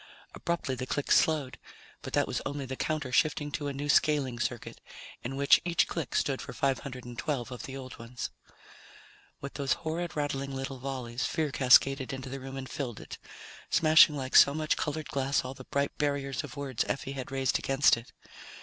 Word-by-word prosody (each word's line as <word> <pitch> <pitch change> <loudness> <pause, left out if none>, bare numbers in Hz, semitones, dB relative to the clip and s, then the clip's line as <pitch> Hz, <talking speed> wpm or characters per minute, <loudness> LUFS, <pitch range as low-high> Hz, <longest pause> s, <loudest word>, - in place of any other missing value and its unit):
Abruptly 170 -6 -2
the 130 0 -4
clicks 145 - +2
slowed, 150 -5 +2 0.4
but - - -8
that - - +3
was - - -3
only 140 0 -4
the 130 0 -5
counter 155 -2 -2
shifting 145 +1 +1
to 145 0 -3
a - - -1
new 140 +1 -4
scaling 140 -4 +2
circuit, 120 -1 -4 0.4
in 130 +3 -4
which 140 +1 +5
each 170 -1 +2
click 160 -7 -4
stood 135 -2 +1
for - - -8
512 125 -1 -2
of 125 -3 -6
the 135 0 -6
old 130 -2 -9
ones. 120 +1 -6 1.1
With 140 - -6
those 140 -2 0
horrid, 170 +2 -2
rattling 140 -2 -2
little 135 0 -5
volleys, 130 -2 -3
fear 155 -3 -1
cascaded 135 +1 +4
into 130 0 -6
the 135 - -5
room 135 +1 -7
and 130 -1 -5
filled 125 -5 -5
it, - - -9 0.5
smashing 155 -1 +6
like 130 -1 -4
so 140 - +8
much 155 -1 +1
colored 155 0 -3
glass 135 0 0
all 130 - -5
the - - -12
bright 140 0 -1
barriers 140 -3 -1
of - - -9
words 135 -4 -1
Effie 135 0 -3
had 135 -2 -6
raised 135 -1 +1
against 135 +1 +4
it. 115 +1 -11
135 Hz, 185 wpm, -30 LUFS, 130-145 Hz, 1.1 s, so